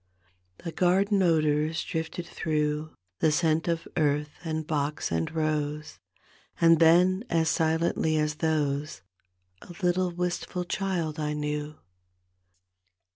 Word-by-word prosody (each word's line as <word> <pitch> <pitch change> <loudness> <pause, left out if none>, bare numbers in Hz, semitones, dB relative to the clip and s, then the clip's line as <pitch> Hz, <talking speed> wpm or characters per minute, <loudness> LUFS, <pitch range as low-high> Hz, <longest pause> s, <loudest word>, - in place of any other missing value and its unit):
The 165 - -4
garden 195 +4 +2
odors 155 -2 +2
drifted 165 +1 -4
through. 150 -2 -2 0.2
The 160 - +3
scent 160 0 +1
of 165 -1 -1
earth 150 -2 +1
and 160 -2 -3
box 150 -1 -2
and 80 0 0
rose, 155 -1 -2 0.6
And 165 -1 +5
then, 180 +4 +5
as 165 -1 +2
silently 160 0 +1
as 150 0 0
those, 150 - -1 0.6
A 175 - -12
little 180 +1 +2
wistful 180 +1 -3
child 175 -5 -2
I 150 -1 -1
knew. 150 0 -3
160 Hz, 115 wpm, -27 LUFS, 150-170 Hz, 0.6 s, And